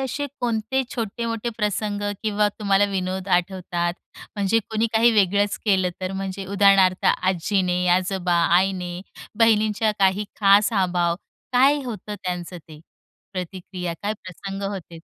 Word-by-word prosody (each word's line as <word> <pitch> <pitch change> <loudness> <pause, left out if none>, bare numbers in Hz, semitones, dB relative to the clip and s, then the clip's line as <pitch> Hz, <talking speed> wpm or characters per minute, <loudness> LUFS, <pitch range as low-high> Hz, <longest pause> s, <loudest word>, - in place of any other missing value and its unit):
असे 270 +2 -2
कोणते 235 +2 0
छोटे-मोठे 230 0 -3
प्रसंग 210 -1 -1 0.2
किंवा 210 -1 +2
तुम्हाला 200 -1 +3
विनोद 190 0 -3
आठवतात? 175 -1 -3 0.4
म्हणजे 205 +2 +2
कोणी 220 +1 +1
काही 230 +2 +5
वेगळंच 205 0 +2
केलं 190 -3 +3
तर 185 0 -3
म्हणजे 195 0 -4
उदाहरणार्थ 195 -1 +4
आजीने, 180 0 +1
आजोबा, 185 -1 -1 0.2
आईने, 180 -2 -1 0.4
बहिणींच्या 215 -1 +3
काही 195 +1 +2 0.2
खास 205 +2 +5
अभाव 175 -2 +1 0.4
काय 275 +3 +4
होतं 210 -3 -6
त्यांचं 180 -1 -4
ते 155 -1 -12 0.5
प्रतिक्रिया, 180 -1 -5
काय 205 +1 0
प्रसंग 195 +2 -7
होते? 170 -4 -8
195 Hz, 125 wpm, -23 LUFS, 185-215 Hz, 0.5 s, काही